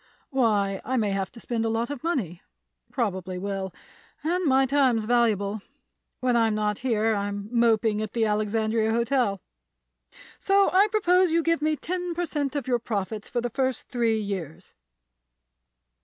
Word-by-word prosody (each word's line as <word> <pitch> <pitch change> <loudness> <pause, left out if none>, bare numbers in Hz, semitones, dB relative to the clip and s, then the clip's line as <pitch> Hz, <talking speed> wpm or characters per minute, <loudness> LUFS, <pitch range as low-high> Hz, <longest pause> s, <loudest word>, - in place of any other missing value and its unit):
"Why, 205 -7 +1
I 260 - -1
may 210 -4 +1
have 195 -1 -2
to 235 - -11
spend 230 -1 -2
a 225 - 0
lot 230 +3 -1
of 285 -4 -6
money; 215 - -2 0.5
probably 190 -6 -2
will; 195 0 -3 0.5
and 355 +4 0
my 270 -2 +4
time's 260 -5 +2
valuable; 215 -3 +1 0.6
when 250 -1 +2
I'm 225 -2 +3
not 210 -1 -1
here 225 -3 +1
I'm 200 0 -3
moping 225 -3 +2
at 215 -1 -5
the 230 -2 +1
Alexandria 220 +1 0
Hotel; 235 -4 +1 1.0
so 395 0 +3
I 390 +3 +6
propose 370 -4 +3
you 330 +1 +2
give 330 -1 +1
me 310 0 +1
ten 355 +2 -4
per 350 +1 -1
cent 290 -4 -2
of 280 -4 -3
your 245 -2 +2
profits 215 -1 -4
for 240 - -1
the 240 0 -3
first 260 -1 -2
three 230 -3 +1
years." 190 -7 -6
230 Hz, 160 wpm, -26 LUFS, 210-270 Hz, 1.0 s, I